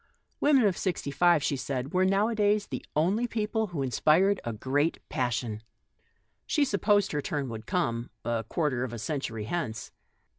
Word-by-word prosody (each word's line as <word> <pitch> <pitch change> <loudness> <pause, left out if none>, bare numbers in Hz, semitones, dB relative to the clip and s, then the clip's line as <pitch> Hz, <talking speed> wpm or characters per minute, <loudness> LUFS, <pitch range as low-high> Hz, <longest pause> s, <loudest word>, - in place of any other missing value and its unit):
Widows 285 -4 +4
of 195 -4 +2
sixty 175 -6 -2
five, 170 +1 +4
she 145 - +1
said, 130 +1 -4
were 185 0 +3
nowadays 205 +1 +2
the - - -6
only 195 +10 +2
people 220 -1 -1
who 165 -7 -3
inspired 165 +9 +3
a 115 - -3
great 140 +8 0
passion. 120 -5 -2 0.9
She 295 -2 +2
supposed 205 -3 +2
her 150 - -1
turn 140 -2 -3
would 110 -1 -7
come 120 -10 -1
— - - -44
a 115 -1 0
quarter 145 -7 0
of 125 -2 -4
a - - -4
century 115 -1 -3
hence. 115 -2 -4
150 Hz, 170 wpm, -28 LUFS, 125-200 Hz, 0.9 s, Widows